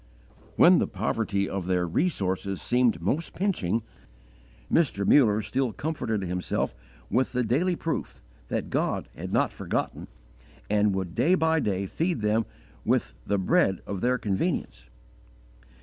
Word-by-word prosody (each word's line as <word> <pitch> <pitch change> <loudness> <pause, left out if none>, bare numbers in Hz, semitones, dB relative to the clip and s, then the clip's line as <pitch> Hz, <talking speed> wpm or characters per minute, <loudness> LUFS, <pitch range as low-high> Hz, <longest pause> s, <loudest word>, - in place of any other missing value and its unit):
When - - +7
the - - +1
poverty 100 -3 -1
of 95 -2 -4
their 90 -1 +1
resources 95 - -1
seemed 120 -9 +1
most 145 - -1
pinching, 115 - 0 0.9
Mr. 130 -12 +2
Muller 110 -6 +5
still 130 0 -1
comforted 120 -10 -2
himself 90 0 -2 0.4
with 125 +4 +1
the 125 0 +1
daily 160 +11 +1
proof 160 - -4 0.3
that - - -3
God - - -1
had - - -6
not - - +2
forgotten, - - -3 0.6
and 105 -1 +3
would 95 -3 -3
day 150 - +3
by 160 -2 +2
day 100 -6 -1
feed 165 - -1
them 110 +1 +1 0.4
with - - +1
'the 100 - +1
bread 95 0 +2
of 100 -2 -4
their 125 +1 +2
convenience.' 100 - -2
110 Hz, 135 wpm, -27 LUFS, 95-135 Hz, 0.9 s, When